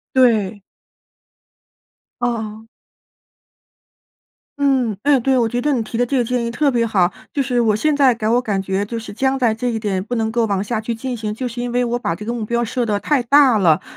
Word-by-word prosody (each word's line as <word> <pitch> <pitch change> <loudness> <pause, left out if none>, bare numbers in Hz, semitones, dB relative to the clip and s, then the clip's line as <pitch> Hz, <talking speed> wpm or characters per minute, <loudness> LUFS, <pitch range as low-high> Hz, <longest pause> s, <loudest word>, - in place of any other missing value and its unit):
对。 220 -5 +3 1.6
哦。 220 -2 -3 1.9
嗯， 265 -6 +1
哎 285 -2 +4
对， 265 +2 +2
我 235 -2 +2
觉 245 +2 -2
得 295 - +1
你 245 - 0
提 225 +1 -5
的 245 - +2
这 270 +3 -1
个 245 - +2
建 245 0 -1
议 235 - -3
特 285 +4 +1
别 240 -3 +1
好。 190 -5 +2 0.2
就 285 - 0
是 250 -2 0
我 220 -3 +2
现 300 +7 +1
在 275 -3 +4
给 220 -2 -3
我 240 +2 +3
感 205 -5 -1
觉 190 +1 -2
就 230 +2 -5
是 225 - -9
僵 265 +4 0
在 240 -4 +2
这 245 +3 -3
一 225 -2 -2
点 195 -4 -2
不 230 - -6
能 220 -1 -1
够 230 0 +1
往 200 -2 -1
下 220 +1 -2
去 225 +2 -3
进 250 +2 -4
行， 215 -1 -3
就 250 +4 -4
是 240 0 -5
因 245 0 -3
为 245 +1 +1
我 240 0 -1
把 245 -8 -2
这 210 +5 -8
个 235 - -2
目 230 -3 -3
标 235 +2 0
设 240 +2 -2
得 210 -2 0
太 280 +2 +1
大 270 -1 +5
了， 165 -6 +3
235 Hz, 245 characters per minute, -19 LUFS, 215-250 Hz, 1.9 s, 大